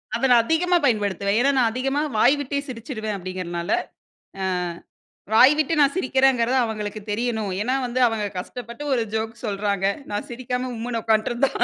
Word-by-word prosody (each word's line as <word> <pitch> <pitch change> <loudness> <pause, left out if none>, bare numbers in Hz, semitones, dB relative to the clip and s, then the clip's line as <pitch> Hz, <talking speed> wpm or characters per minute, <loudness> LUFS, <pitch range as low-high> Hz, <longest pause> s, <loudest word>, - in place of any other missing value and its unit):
அத 235 - -4
நான் 235 -2 +6
அதிகமா 350 +4 +2
பயன்படுத்துவேன். 205 -3 +1
ஏன்னா, 275 +3 +4
"நான் 230 -3 +3
அதிகமா 270 +4 -1 0.2
வாய் 255 +6 +5
விட்டே 280 0 -2
சிரிச்சிருவேன்." 225 -3 -5
அப்படீங்கிறனால. 175 -2 -4 0.7
அ - - 0 0.9
வாய் 260 +6 +7
விட்டு 310 +2 +1
நான் 280 -1 +4
சிரிக்கிறேங்கிறது 265 -4 +2
அவங்களுக்கு 215 -1 -4
தெரியணும். 220 -2 -1
ஏன்னா 255 +4 0
வந்து, 245 +1 -2
அவங்க 220 -2 -2
கஷ்டப்பட்டு 235 +7 -7
ஒரு 240 - +1
ஜோக் 220 +1 -3
சொல்றாங்க. 200 -1 -1 0.3
நான் 205 - -3
சிரிக்காம 250 +1 -3
உம்முன்னு 230 0 -3
உக்கான்ட்டுருந்தா 225 +4 +1
235 Hz, 150 wpm, -23 LUFS, 215-260 Hz, 0.9 s, வாய்